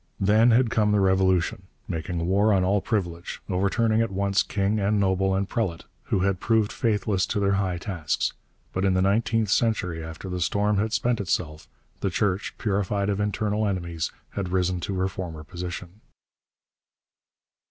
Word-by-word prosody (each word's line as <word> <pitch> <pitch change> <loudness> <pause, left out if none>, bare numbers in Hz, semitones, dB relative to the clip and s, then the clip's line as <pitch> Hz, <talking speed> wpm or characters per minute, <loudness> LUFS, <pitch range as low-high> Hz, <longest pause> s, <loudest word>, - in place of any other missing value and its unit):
Then 110 +4 +4
had 120 0 +4
come 105 -2 +2
the 105 - +3
Revolution, 95 -1 +2 0.2
making 85 0 -3
war 100 +4 +3
on 95 -2 +3
all 100 +2 +2
privilege, 85 -7 -3
overturning 110 +4 +1
at 115 - 0
once 100 +1 +1
king 100 +1 0
and 105 +1 +1
noble 95 0 +2
and 100 0 0
prelate 95 -7 -2 0.2
who 95 - 0
had 95 -1 +1
proved 110 -1 +2
faithless 105 -4 0
to - - -1
their 100 -1 +2
high 95 -2 0
tasks. 85 -5 -2 0.4
But 95 - -1
in 95 -1 +3
the 95 - +3
nineteenth 110 +2 +1
century, 95 -7 +1
after 80 +3 -8
the 90 -1 -3
storm 100 +4 +1
had 110 +1 0
spent 120 -1 +1
itself, 80 -5 -2 0.3
the - - 0
Church, 100 -1 -1
purified 100 -1 0
of 100 - -2
internal 105 +1 0
enemies, 85 -4 -2 0.2
had 100 -3 -3
risen 90 0 0
to 95 +2 -3
her 95 0 +1
former 85 -5 -6
position. 90 +4 -7
95 Hz, 165 wpm, -25 LUFS, 90-105 Hz, 0.4 s, Then